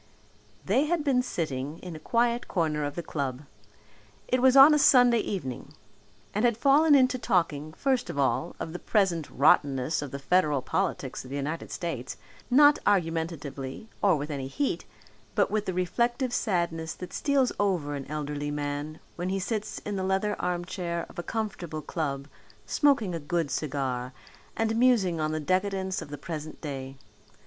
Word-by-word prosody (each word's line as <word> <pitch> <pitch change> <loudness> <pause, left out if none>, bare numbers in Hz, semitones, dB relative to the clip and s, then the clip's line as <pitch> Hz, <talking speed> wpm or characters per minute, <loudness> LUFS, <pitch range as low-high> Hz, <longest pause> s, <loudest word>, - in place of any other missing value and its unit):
They 275 - +3
had 330 0 0
been 270 -4 +3
sitting 150 - -3
in 175 -2 -8
a - - -8
quiet 235 +7 +1
corner 155 -4 0
of 145 - -4
the 170 - -4
club 135 -3 -3 0.8
it 255 0 +1
was 260 +1 +5
on 275 +3 +10
a 300 - +4
Sunday 245 -4 +6
evening 135 - -5 0.6
and 210 - 0
had 235 -3 +3
fallen 290 +4 +5
into 255 -1 +3
talking, 165 -9 0
first 260 +2 0
of - - -5
all, 140 +5 0
of 160 - -5
the 175 - -5
present 180 -7 +1
rottenness 140 +1 +3
of 145 - -5
the 140 - -5
federal 150 -2 +2
politics 145 -5 -2
of 130 - -11
the 140 - -5
United 150 +4 -3
States 135 -8 -4 0.3
not 290 +3 +6
argumentatively 165 -3 -1
or 195 -4 +4
with 150 +1 -4
any 135 -2 -4
heat, 275 - -2 0.5
but - - +2
with 215 0 -1
the 185 - -1
reflective 240 +7 0
sadness 170 -7 -1
that 180 -1 -9
steals 275 -3 +2
over 180 -8 0
an 140 -2 -5
elderly 145 -1 -3
man 145 +1 -4 0.2
when 175 +1 -2
he 195 - 0
sits 210 +2 -3
in 205 -1 -3
the 190 - -2
leather 190 +2 0
armchair 175 -1 -2
of - - -10
a - - 0
comfortable 175 -7 -4
club 140 -4 -3 0.4
smoking 230 - +2
a 165 - -2
good 160 -1 -1
cigar 130 -3 -2 0.4
and 225 0 +1
musing 225 -9 +3
on 155 0 0
the 155 - -1
decadence 190 +3 -1
of - - -8
the 145 - -6
present 155 0 -7
day. 135 -3 -6
170 Hz, 170 wpm, -28 LUFS, 145-220 Hz, 0.8 s, on